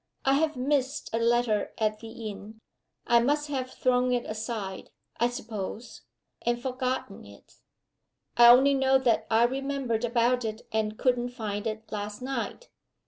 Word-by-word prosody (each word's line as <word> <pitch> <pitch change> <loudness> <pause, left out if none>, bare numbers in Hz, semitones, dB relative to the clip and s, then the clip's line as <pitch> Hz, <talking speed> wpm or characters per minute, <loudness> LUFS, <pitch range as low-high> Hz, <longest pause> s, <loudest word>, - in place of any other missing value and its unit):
I 270 - +4
have 310 +2 +1
missed 275 +2 -1
a 225 - +1
letter 230 -2 +1
at 215 -1 0
the 225 - -9
inn 220 -1 -8 0.5
I 235 -1 +5
must 290 +5 +1
have 260 -3 -2
thrown 250 -1 +1
it 245 -1 -1
aside, 215 -3 -5 0.3
I 240 - +2
suppose, 230 -2 -6 0.4
and 240 0 0
forgotten 255 -4 -3
it. 100 0 -17 0.8
I 240 0 +8
only 265 +4 +7
know 265 0 +4
that 250 -4 +1
I 225 +1 +4
remembered 265 -2 -1
about 240 +1 +2
it, 220 0 -4
and 215 -1 -1
couldn't 245 -1 +1
find 215 -3 -4
it 220 0 -6
last 205 -1 -4
night. 270 - -4
240 Hz, 150 wpm, -28 LUFS, 220-260 Hz, 0.8 s, I